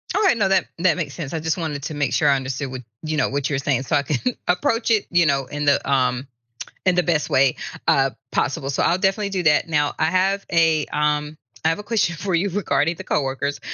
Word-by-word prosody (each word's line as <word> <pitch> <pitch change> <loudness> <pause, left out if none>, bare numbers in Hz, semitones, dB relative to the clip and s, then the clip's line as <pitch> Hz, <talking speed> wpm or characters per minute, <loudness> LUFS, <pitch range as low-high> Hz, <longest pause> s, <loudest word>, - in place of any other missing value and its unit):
Alright, 400 - +3
no, 205 -3 +2
that 190 0 +3
that 180 -1 +3
makes 145 -5 -3
sense. 155 -4 -6
I 165 - -1
just 160 +2 -1
wanted 155 -5 -4
to 155 - -4
make 145 -3 -1
sure 150 - +2
I 140 - +5
understood 130 0 -4
what 130 -1 -6 0.2
you 155 0 -2
know, 155 - +1
what 140 0 -1
you're 140 -2 -1
saying 135 -2 0
so - - 0
I - - +3
can 150 - -1
approach 225 +7 +1
it 220 -3 +2
in 145 -4 +1
the, 140 -1 +4
um, 130 -1 +1 0.6
in 185 -1 +3
the 180 - +3
best 165 -4 0
way, 130 -1 +3 0.3
uh, 135 0 +4 0.2
possible, 135 -1 -1
so - - -1
I'll 170 - +3
definitely 195 +2 0
do 190 -2 -2
that. 150 +1 +3
Now, 150 -3 +1
I - - +3
have 190 +4 +1
a, 160 -2 +3
um 150 0 -1 0.3
I 160 - +3
have 165 - -1
a - - -7
question 205 -6 0
for 185 +3 -3
you 180 +4 +1
regarding 175 -4 0
the - - -8
coworkers. 135 0 -2
155 Hz, 230 wpm, -22 LUFS, 140-180 Hz, 0.6 s, I